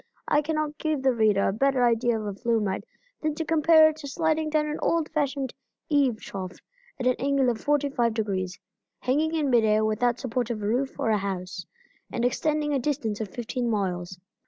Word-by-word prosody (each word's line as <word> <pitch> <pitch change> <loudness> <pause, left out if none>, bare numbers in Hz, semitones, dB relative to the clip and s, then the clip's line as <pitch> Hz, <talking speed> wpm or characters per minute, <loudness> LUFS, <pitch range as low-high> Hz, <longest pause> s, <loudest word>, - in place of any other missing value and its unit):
I 295 - +3
cannot 305 0 -2
give 310 -4 -1
the 265 -1 +4
reader 215 -4 +3
a - - 0
better 265 +2 +2
idea 235 -1 +2
of 215 - -5
a 205 - -3
flume 230 +1 0
ride 190 -2 -3 0.3
than 310 -1 -1
to 325 - -3
compare 315 0 +6
it 310 - -6
to 285 - -8
sliding 315 +1 0
down 305 0 +1
an 300 0 -3
old 330 -2 +1
fashioned 280 -4 -1 0.4
eve 275 -7 +2
trough 185 -2 -7 0.4
at 250 - -3
an 255 - +4
angle 275 -2 +2
of 220 - -6
45 280 -5 +1
degrees, 190 -4 -2 0.4
hanging 305 +5 +1
in 295 -4 +1
mid 235 -2 +5
air 215 0 +3
without 235 +3 +1
support 250 -2 -2
of 215 -3 -3
roof 245 +6 -1
or 225 - +1
house, 190 -3 -3 0.4
and 240 - -1
extending 300 +3 0
a 275 - +2
distance 235 -6 -2
of 215 - -2
fifteen 240 +3 -3
miles. 185 -4 -2
250 Hz, 195 wpm, -26 LUFS, 215-295 Hz, 0.4 s, compare